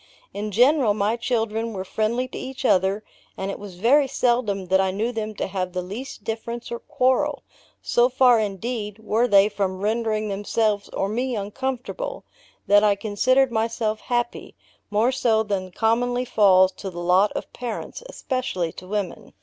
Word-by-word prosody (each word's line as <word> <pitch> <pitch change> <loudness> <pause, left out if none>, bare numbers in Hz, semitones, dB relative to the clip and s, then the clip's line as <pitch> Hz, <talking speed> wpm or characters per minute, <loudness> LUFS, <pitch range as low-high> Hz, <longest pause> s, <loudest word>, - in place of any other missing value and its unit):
In 210 +1 -4
general, 245 +1 +4
my 210 +2 +1
children 225 -1 -1
were 190 -1 -5
friendly 230 +6 -1
to - - -10
each 265 0 -6
other, 195 0 +2 0.3
and 195 +1 -3
it - - -7
was 200 -3 -9
very 265 +9 +4
seldom 235 -7 0
that 190 +1 +4
I 190 - +1
knew 210 +6 -1
them 215 -2 -4
to - - -2
have 185 -2 -3
the 180 -1 -2
least 215 +5 -7
difference 230 +2 -5
or 235 - -3
quarrel: 290 +1 0 0.4
so 240 +1 +3
far, 250 -2 +5
indeed, 210 +1 -3
were 220 +2 +1
they 200 -2 +6
from 195 -3 -2
rendering 215 0 0
themselves 205 +1 0
or 195 - -2
me 245 +4 -1
uncomfortable, 255 - -4 0.4
that 205 +1 +5
I 205 -1 +4
considered 250 +6 +2
myself 220 -1 -1
happy 240 -1 -3 0.3
more 215 +4 +2
so 225 -4 +2
than 195 -3 -3
commonly 245 +5 +1
falls 190 -5 +5
to 195 - -5
the 175 - -11
lot 180 +4 +3
of - - -6
parents, 240 - -6
especially 255 - -2
to 185 - -11
women. 200 -3 -4
220 Hz, 165 wpm, -23 LUFS, 200-245 Hz, 0.4 s, they